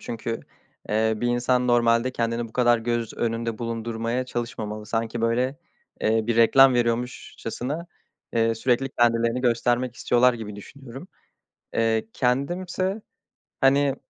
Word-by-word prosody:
çünkü, 115 0 -4 0.5
eee, 110 +1 +2
bir 120 - -2
insan 125 +1 +1
normalde 120 +1 +3
kendini 115 -1 -2
bu - - -20
kadar 120 -1 +3
göz 120 -1 -2
önünde 115 -1 -2
bulundurmaya 115 +1 -3
çalışmamalı. 110 -3 -5
Sanki 115 0 -2
böyle, 125 +4 0 0.4
eee, 110 0 +1
bir 115 -1 0
reklam 130 +3 +6
veriyormuşçasına, 125 +5 -2 0.5
eee, 115 -1 +2
sürekli 125 +3 +1
kendilerini 115 -1 +1
göstermek 120 0 +1
istiyorlar 125 0 +3
gibi 105 -3 -7
düşünüyorum. 135 - -11 0.7
Eee, 115 -1 +1
kendim 140 +8 0
ise 185 +4 -2 0.6
hani 135 0 +4
120 Hz, 125 wpm, -24 LUFS, 115-125 Hz, 0.7 s, reklam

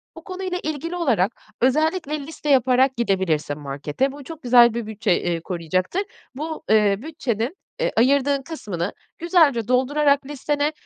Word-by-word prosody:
Bu - - -11
konuyla 370 -1 -4
ilgili 310 +3 -3
olarak 240 - +1 0.3
özellikle 305 +4 +1
liste 300 +1 -6
yaparak 260 0 +4
gidebilirsin 175 -9 0
markete. 145 - -2
Bu 285 +1 -10
çok 320 +1 -10
güzel 240 -1 +6
bir 235 -1 -3
bütçe, 215 -2 -2
eee, 170 -1 -1
koruyacaktır. 185 - -2 0.3
Bu, 315 +3 -5
eee, 210 -2 +4
bütçenin, 260 - -3 0.2
eee, - - 0
ayırdığın 275 +3 +3
kısmını 205 - -5 0.2
güzelce 315 - +3
doldurarak 280 +3 +2
listene, 290 +1 -1
265 Hz, 140 wpm, -22 LUFS, 210-300 Hz, 0.3 s, güzel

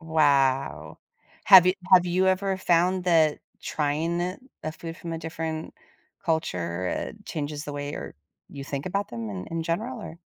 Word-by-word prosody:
Wow. 140 - +1 0.5
Have 190 -3 +9
you 185 - +4 0.2
have 180 -1 +7
you 185 +2 +2
ever 190 +1 +1
found 180 0 +2
that 160 -4 +4 0.2
trying 160 +3 -1
it 180 +1 -3 0.2
a 155 - -3
food 165 +1 -8
from 170 -1 -6
a 165 - -3
different 160 0 -5 0.5
culture, 90 - -1
uh, - - -3
changes 150 -2 -4
the 145 - -6
way 145 0 -4
you're - - -7 0.3
you 140 - -8
think 140 +3 -4
about 200 +2 -1
them 115 -2 -5
in 95 -2 -6
in 165 0 -2
general, 220 +9 -3
or 170 -5 -9
160 Hz, 170 wpm, -26 LUFS, 145-180 Hz, 0.5 s, Have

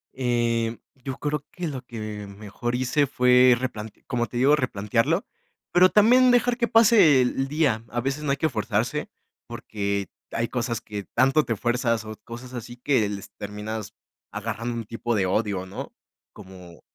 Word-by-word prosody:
Em, 120 -2 0 0.3
yo 135 -2 -5
creo 150 0 -2
que 180 -2 -4
lo 135 -4 -5
que 110 -4 -7
mejor 105 +4 -5
hice 130 +3 +1
fue 125 -1 +5
replante 110 -4 -6
como 120 -2 -1
te 120 - -6
digo, 140 +4 +5
replantearlo, 125 - 0 0.5
pero 185 +1 +6
también 250 +5 +6
dejar 245 0 +3
que 235 -2 +1
pase 220 - +6
e - - +5
el 135 +2 -1
día, 140 -7 +1
a 120 - -2
veces 135 +4 -2
no 145 - -2
hay 140 - +1
que 160 - +1
forzarse, 110 -1 -1 0.4
porque 100 -2 -3 0.2
hay 115 0 -1
cosas 120 -2 -2
que 105 -2 -7
tanto 135 +5 +4
te 115 - -1
fuerzas, 115 -1 0
o 110 0 -7
cosas 125 +2 -9
así 120 0 -7
que 125 -5 +1
les 100 -2 -7
terminas 105 +1 -6 0.4
agarrando 115 +2 -4
un 115 - -3
tipo 115 +1 -2
de 95 -2 +1
odio, 95 -1 -1
¿no? 95 - -7 0.4
Como 95 -4 -13
120 Hz, 170 wpm, -25 LUFS, 110-135 Hz, 0.5 s, pero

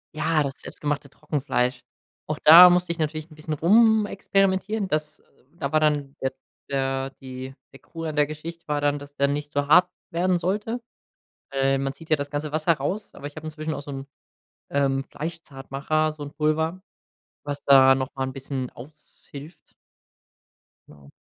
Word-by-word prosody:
Ja, 155 0 +1
das 135 -1 -5
selbstgemachte 145 -1 -4
Trockenfleisch. 130 -4 -2 0.4
Auch 155 -1 -4
da 170 +4 +11
musste 180 -1 +2
ich 165 - -13
natürlich 155 0 -2
'n 155 - -15
bisschen 155 0 -5
rumexperimentieren. 200 +1 +2
Das 155 -3 -3 0.3
da 140 -3 -4
war 155 - +4
dann 145 -2 +1
der 130 - 0 0.4
der 135 -1 -1
die 130 0 -8 0.2
der 135 - -13
Krux 165 -1 -9
an 155 - -3
der 150 -1 +4
Geschichte 160 +3 -8
war 150 0 +1
dann, 145 0 +1
dass 145 0 -12
der 140 - +3
nicht 145 +1 -3
so 145 0 -1
hart 180 +4 +6 0.2
werden 180 +2 +1
sollte. 210 +7 -2 0.7
Äh, 135 0 +2
man 135 0 -2
zieht 160 +4 -14
ja 155 - +5
das 145 -1 -5
ganze 145 0 -3
Wasser 155 +2 +2
raus, 175 +9 -4
aber 145 - -7
ich 145 - -12
habe 155 0 -8
inzwischen 155 0 -4
auch - - -5
so 145 -1 -9
'n, 135 0 -7 0.6
ähm, 135 -1 +1
Fleischzartmacher, 155 0 -3
so 150 -1 -10
'n 145 - -6
Pulver, 160 +3 0 0.6
was 145 -1 -5
da 135 -1 +7
noch 130 0 -3
mal 135 - -3
'n 130 - -4
bisschen 135 -1 -4
aushilft. 150 +2 -13 1.3
Genau. 70 -2 -17
150 Hz, 170 wpm, -24 LUFS, 140-160 Hz, 1.3 s, da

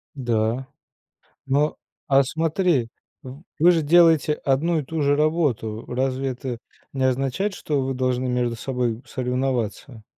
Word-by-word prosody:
Да. 120 0 -1 0.8
Но, 145 +3 +1 0.3
а 135 -1 +5
смотри, 160 -3 0 0.3
в 130 +5 -10 0.2
вы 170 +4 +6
же 165 -2 +2
делаете 160 -1 +5
1 155 +4 0
и - - -3
ту 160 +3 -4
же 145 0 +3
работу. 145 -8 0
Разве 130 +1 -1
это 125 -1 -5 0.4
не 135 -1 -1
означает, 135 +10 0
что 145 -6 -2
вы 135 0 -2
должны 130 0 -1
между 125 -1 0
собой 120 -1 -2
соревноваться? 125 -2 -3
135 Hz, 135 wpm, -23 LUFS, 125-150 Hz, 0.8 s, вы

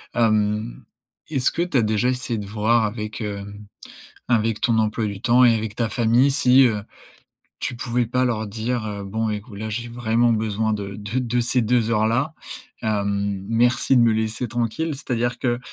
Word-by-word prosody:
Hem, 110 0 +1 0.5
est-ce 135 -4 +1
que 170 - -2
tu 175 -6 0
as - - +4
déjà 110 +3 +1
essayé 125 -2 -2
de 100 - -6
voir 110 +2 +2
avec, 105 +1 -5
hem, 100 0 -6 0.6
avec 115 -2 +1
ton 115 -4 +2
emploi 110 +1 0
du 100 -1 -5
temps 125 +2 +4
et 115 - +6
avec 110 -1 -4
ta 115 -2 -1
famille 120 +5 +3
si, 130 -1 +5
heu, 105 -4 +1 0.8
tu - - -3
pouvais 120 -1 -1
pas 125 +2 +1
leur 110 -3 -1
dire: 115 +2 -3
«Heu, 100 -1 -5
bon 110 +2 -2
écoute, 105 0 -6
là, 110 0 -4
j'ai 120 +2 -4
vraiment 120 0 +1
besoin 110 0 0
de 100 -1 -5
de 105 +4 -3
de 120 -1 0
ces 120 +1 +1
2 115 0 +1
heures-là, 120 +8 +1 0.5
hem, 100 -2 -1
merci 120 +3 +2
de 120 - +6
me 115 -1 +4
laisser 110 +2 -1
tranquille»? 120 +7 -2
C'est-à-dire 120 -3 -2
que 120 -1 0
115 Hz, 185 wpm, -22 LUFS, 105-120 Hz, 0.8 s, et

